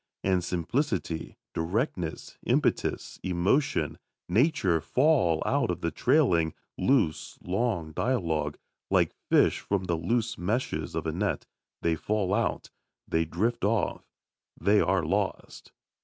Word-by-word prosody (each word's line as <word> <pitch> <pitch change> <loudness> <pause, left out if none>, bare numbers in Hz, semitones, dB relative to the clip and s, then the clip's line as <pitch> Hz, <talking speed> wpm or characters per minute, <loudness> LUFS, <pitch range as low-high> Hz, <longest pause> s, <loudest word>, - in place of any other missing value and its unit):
And 95 -2 +2
simplicity, 90 - -2 0.2
directness, 90 - -2
impetus, - - 0
emotion, 95 +11 +1 0.3
nature 100 - +2
fall 125 - +3
out 140 -5 +1
of 90 0 -2
the 85 - -1
trailing, 90 - +2 0.2
loose, 110 - +1
long 90 -4 -1
dialogue, 85 -6 -1 0.3
like - - +3 0.2
fish - - +4
from 100 -2 -1
the 85 -2 -1
loose 115 +6 -1
meshes 110 +9 -2
of - - -2
a - - 0
net - - -1 0.4
they 85 - +3
fall 100 +3 -1
out, - - -1 0.4
they 80 0 +1
drift 110 +9 -1
off, 110 +2 0 0.5
they 105 +1 +4
are 95 -4 +2
lost. 100 +4 -2
95 Hz, 120 wpm, -28 LUFS, 85-120 Hz, 0.5 s, fish